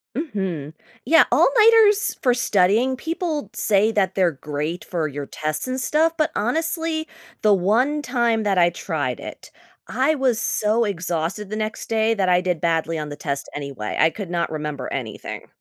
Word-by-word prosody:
Mhm. 190 - -3 0.3
Yeah, 325 +5 +6
all-nighters 445 -3 +5
for 250 -4 +3
studying, 225 +3 +2
people 320 - -3
say 210 +1 +2
that 190 -4 0
they're 180 -3 +3
great 150 +4 -4
for 165 -4 -2
your 145 0 -6
tests 155 - -4
and 260 +1 -2
stuff, 320 +4 +2
but, 310 0 +1
honestly, 320 - -1 0.3
the 210 -1 +5
one 240 +11 +2
time 235 -4 0
that 195 -3 +1
I 175 0 +5
tried 145 -8 -3
it, - - -10 0.4
I 265 +7 +1
was 255 -4 +1
so 220 +2 +1
exhausted 175 +1 -3
the 215 - -4
next 215 0 -4
day 225 0 +2
that 190 -4 0
I 180 0 +4
did 180 -3 -1
badly 165 -1 0
on 150 -1 -4
the 145 - -6
test 140 -1 -4
anyway. 140 -7 -5
I 160 - +5
could 195 -1 -7
not 170 -2 -1
remember 150 -3 -4
anything. 120 -6 -6
200 Hz, 170 wpm, -22 LUFS, 165-260 Hz, 0.4 s, Yeah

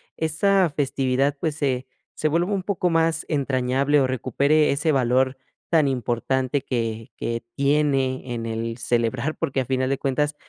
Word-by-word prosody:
esa 180 +3 +2
festividad, 140 -1 0
pues, 155 -2 -1
se 130 -4 -1 0.3
se 155 - 0
vuelva 175 +6 +1
un 190 - -1
poco 180 -2 0
más 165 -1 +1
entrañable, 140 0 +1
o 130 - +2
recupere 140 +4 +2
ese 150 +2 +1
valor 130 +1 +2 0.3
tan 155 -4 +4
importante 130 +2 -1
que 115 -3 -3
que 115 0 -3
tiene 135 -3 +1
en 115 -1 -4
el 115 0 -3
celebrar? 120 +4 -1
Porque, 135 -1 -1
a - - -4
final 130 +1 0
de 135 - 0
cuentas, 145 +2 0
135 Hz, 155 wpm, -23 LUFS, 125-150 Hz, 0.3 s, tan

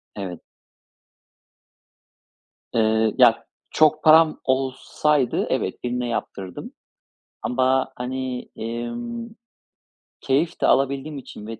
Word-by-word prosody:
Evet. 95 -4 -6 2.3
Eee, 110 -1 +2
ya - - +5 0.3
çok 155 0 +3
param 160 0 +6
olsaydı, 135 +1 0
evet, - - -2
birine 125 0 -2
yaptırırdım 95 -5 -5 0.7
ama, 130 +1 +1
hani, 125 0 -4
emm, 230 - -5 0.9
keyif 145 +5 0
de - - +3
alabildiğim 140 +2 +1
için 105 -5 -10
ve 115 0 -7
130 Hz, 90 wpm, -23 LUFS, 115-150 Hz, 2.3 s, param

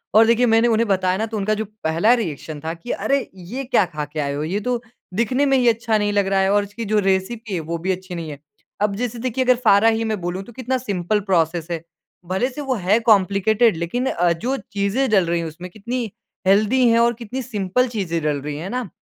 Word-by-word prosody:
और 220 +1 +8
देखिए, 235 +2 +4
मैंने 225 0 +4
उन्हें 230 0 +2
बताया 185 -2 +1
ना, 220 - -1
तो 225 -1 -5
उनका 210 +1 0
जो 220 - -1 0.2
पहला 165 +9 +3
रिएक्शन 160 - -3
था 160 +1 -2
कि, 170 +8 -7
"अरे! 280 0 +1 0.2
ये 195 +9 -6
क्या 245 -6 +3
खा 150 -4 -5
के 150 +2 -7
आए 140 -1 -1
हो? 145 +1 -3
ये 180 +6 -1
तो 245 +2 -2 0.3
दिखने 235 +7 +1
में 270 -1 +3
ही 250 -2 +2
अच्छा 225 -1 +1
नहीं 205 0 0
लग 200 -1 +2
रहा 195 0 +2
है 190 0 +2
और 205 0 +3
इसकी 205 +3 -7
जो 215 +1 +2
रेसिपी 195 +3 -1
है, 180 - 0
वो 165 +1 -4
भी 180 +3 -1
अच्छी 185 0 -5
नहीं 165 -2 -5
है।" 145 - -9 0.4
अब 205 -1 +1
जैसे 240 +1 -3
देखिए, 255 +1 -1
अगर 255 0 +4
फारा 205 +1 +6
ही 225 0 0
मैं 220 -2 -2
बोलूँ, 175 +2 -3
तो 240 - -14
कितना 260 +2 -2
सिम्पल 205 -4 -1
प्रोसेस 165 -1 +1
है। 165 -1 -3 0.4
भले 190 +8 0
से 270 +3 -7
वो 270 -2 -1
है 200 +1 +2
कॉम्प्लिकेटेड, 215 0 +3
लेकिन 170 +10 -2
अ, 175 -6 +2
जो 245 +11 -2
चीज़ें 215 +3 -1
डल 195 -4 +4
रहीं 170 0 0
उसमें 165 +3 -7
कितनी 230 +2 -4 0.4
हेल्दी 215 +6 +4
हैं 230 0 +4
और 235 0 +4
कितनी 250 +4 -4
सिम्पल 230 0 0
चीज़ें 190 -8 -2
डल 150 -2 0
रही 145 +1 -5
हैं, 150 - -6
है 190 - -5
ना? 250 -3 -3
205 Hz, 245 wpm, -21 LUFS, 180-235 Hz, 0.4 s, और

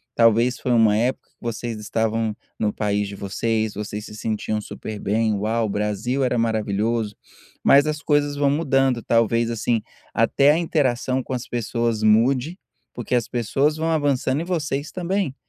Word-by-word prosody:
talvez 115 +2 +4
foi 125 - -2
uma 110 -2 +4
época 125 +3 -1
que - - -39
vocês 115 -1 -4
estavam 110 0 -1 0.2
no 105 -1 0
país 105 -1 -1
de 100 - -7
vocês, 110 +2 -1
vocês 105 +1 -5
se 105 - -10
sentiam 110 0 -2
super 105 0 -7
bem, 110 +1 +1
"uau 110 +3 0
o 105 - -2
Brasil 105 +6 -1
era 125 -1 +1
maravilhoso", 110 -1 0 0.5
mas 140 +2 +6
as 155 0 -2
coisas 145 -2 +1
vão 140 -1 +3
mudando 135 -5 +1
talvez, 115 0 +2
assim, 115 0 0 0.3
até 140 +5 +4
a 155 - +2
interação 130 -6 0
com 130 - -5
as 125 0 -4
pessoas 115 -1 -1
mude, 125 - +3 0.4
porque 120 0 -4
as 120 -2 +1
pessoas 135 +6 0
vão 160 +1 -1
avançando 145 -2 +1
e 170 - -4
vocês 150 -5 -2
também. 180 -5 -2
115 Hz, 165 wpm, -22 LUFS, 110-135 Hz, 0.5 s, mas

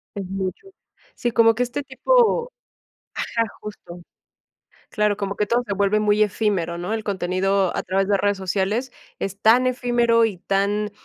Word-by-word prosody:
Es 195 -2 -4
mucho. 195 - -4 0.5
Sí, 240 - -2
como 225 -1 +4
que 250 - +1
este 250 +4 -4
tipo 475 - +2 0.6
ajá, 230 -1 -1 0.2
justo. 180 -4 -10 0.9
Claro, 210 -2 0
como 200 -1 -3
que 210 0 -1
todo, 240 +2 +1
se 200 - -2
vuelve 200 +2 +1
muy 210 0 +2
efímero, 195 -5 0
¿no? 180 +5 -3
El 220 -1 -3
contenido 190 0 0
a - - -1
través 195 +1 0
de 205 - +3
redes 205 0 0
sociales, 200 +7 -1 0.3
es 195 +1 -5
tan 240 +4 +5
efímero, 240 -2 +2
y 200 -5 -3
tan 200 +3 -1
210 Hz, 165 wpm, -22 LUFS, 195-235 Hz, 0.9 s, tan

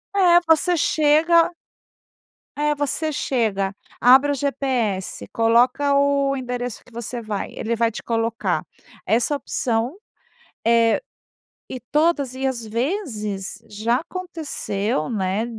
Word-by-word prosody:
É, 355 -3 +6
você 325 +2 +3
chega 325 +2 +3 1.0
É, 295 +1 +1
você 290 +2 -1
chega, 215 -9 -1 0.2
abre 265 +4 +6
o - - +1
GPS, 250 -8 -2
coloca 250 +5 +3
o 280 -1 +2
endereço 245 -2 -4
que 250 - -20
você 235 +1 -5
vai, 215 -3 -4
ele 235 +1 -2
vai 230 0 +2
te - - -8
colocar 230 0 -1 0.4
essa 235 +6 +2
opção, 245 -1 -2 0.7
eh, 230 -1 +4 0.7
e 255 - -5
todas 290 -1 0
e, 265 +1 -3
às 250 -4 -2
vezes, 215 - -3
já 220 +3 0
aconteceu, 300 - -3
né, 200 0 -1
250 Hz, 115 wpm, -22 LUFS, 225-290 Hz, 1.0 s, É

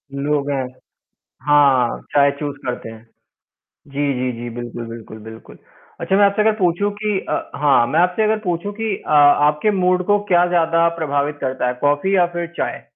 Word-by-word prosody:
लोग 145 0 -1
हैं। 130 -2 -2 0.8
हाँ, 140 -5 +3
चाय 140 0 +4
चूज़ 145 -2 -5
करते 120 -2 -5
हैं। 110 0 -13 0.9
जी, 140 0 -1
जी, 125 0 -2
जी, 120 - -6
बिल्कुल, 120 -1 -6
बिल्कुल, 115 -1 -10
बिल्कुल। 110 +1 -13 0.4
अच्छा 190 - 0
मैं 205 - +5
आपसे 200 +2 +1
अगर 220 - +3
पूछूँ 185 +2 +1
कि 210 -1 -2
अ, - - -3
हाँ 135 -5 +4
मैं 155 +7 +1
आपसे 180 +4 +1
अगर 215 0 +1
पूछूँ 180 +3 -3
कि 220 -2 -1
अ, - - -5
आपके 150 +4 +4
मूड 185 -2 +1
को 205 0 +3
क्या 175 0 +5
ज़्यादा 165 -1 +2
प्रभावित 145 -1 -1
करता 130 -1 -2
है, 125 - -2
कॉफी 145 +7 +1
या 175 -2 +4
फिर 175 0 -3
चाय? - - -3
150 Hz, 180 wpm, -19 LUFS, 135-180 Hz, 0.9 s, मैं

